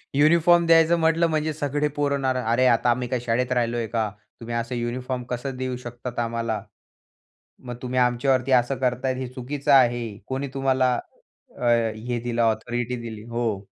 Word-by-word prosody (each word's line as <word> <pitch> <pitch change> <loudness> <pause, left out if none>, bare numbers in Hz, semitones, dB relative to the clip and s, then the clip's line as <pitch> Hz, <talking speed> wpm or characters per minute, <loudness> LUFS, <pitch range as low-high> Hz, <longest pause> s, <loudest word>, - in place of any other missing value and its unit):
Uniform 170 +4 +5
द्यायचं 165 0 +5
म्हटलं 165 +1 +3
म्हणजे 155 0 0
सगळे 145 0 -1
पोरं 140 -1 0
ना, 135 -1 +1 0.2
अरे 130 +2 +3
आता 120 0 +3
आम्ही 125 +1 0
काय 125 0 -1
शाळेत 125 +2 0
राहिलोय 120 -1 0
का? 110 -1 -1 0.3
तुम्ही 115 0 -5
असं 115 +1 -3
युनिफॉर्म 125 +1 -3
कसं 125 +2 -4
देऊ 130 0 -3
शकता 120 0 -5
आम्हाला? 115 -2 -2 1.0
मग 120 -1 -6
तुम्ही 130 0 -2
आमच्यावरती 125 +1 +2
असं 125 +1 +3
करताय 130 0 0
हे 130 -1 -4
चुकीचं 135 +3 -2
आहे. 120 -5 +3
कोणी 135 +1 -3
तुम्हाला 130 -1 +2 0.7
अ, - - -9 0.5
हे 120 -1 0
दिलं 120 -1 -1
ऑथॉरिटी 120 +2 -1
दिली? 110 -2 -7
हो. 115 -4 -2
125 Hz, 160 wpm, -24 LUFS, 120-135 Hz, 1.0 s, युनिफॉर्म